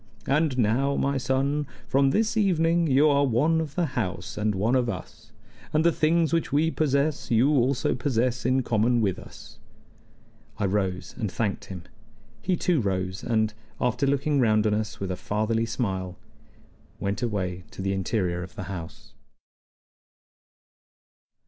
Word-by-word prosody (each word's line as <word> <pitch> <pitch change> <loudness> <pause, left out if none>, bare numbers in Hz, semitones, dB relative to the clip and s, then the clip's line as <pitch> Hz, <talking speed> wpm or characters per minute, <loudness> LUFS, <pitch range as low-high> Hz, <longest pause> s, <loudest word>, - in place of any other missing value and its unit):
And 145 -1 +1
now, 130 +5 +2
my 140 0 0
son, 140 +3 0 0.2
from 135 0 +3
this 220 +8 +1
evening 170 -5 +2
you 140 +2 +4
are 140 -1 +4
one 145 +6 +2
of 150 -2 -6
the 175 - +1
house 95 - -3
and 105 -1 0
one 105 +6 +1
of 125 -2 +2
us, 95 -5 -8 0.4
and 155 +1 +3
the 170 - +6
things 160 0 +2
which 165 -2 0
we 155 +3 +2
possess 145 -1 0
you 120 +4 +4
also 135 -1 +2
possess 125 -2 0
in 130 +1 +2
common 120 +2 +2
with 95 -4 0
us." - - -13 1.0
I 105 - 0
rose 95 -2 -1
and 105 -5 -2
thanked 105 -4 -2
him. 90 -3 -8 0.6
He 185 - +1
too 170 -6 +1
rose, 95 -2 -2
and, 110 -3 +1 0.3
after 125 +3 +1
looking 140 +1 +1
round 110 -3 +3
on 105 - +2
us 105 0 -3
with 95 -1 -3
a - - -1
fatherly 110 +4 -1
smile, 95 -6 -3 0.8
went 100 0 -2
away 90 -6 -2
to 95 - -7
the 95 0 0
interior 95 -2 -1
of 90 +1 -9
the 95 - -5
house. 85 -2 -9
120 Hz, 155 wpm, -26 LUFS, 100-140 Hz, 1.0 s, the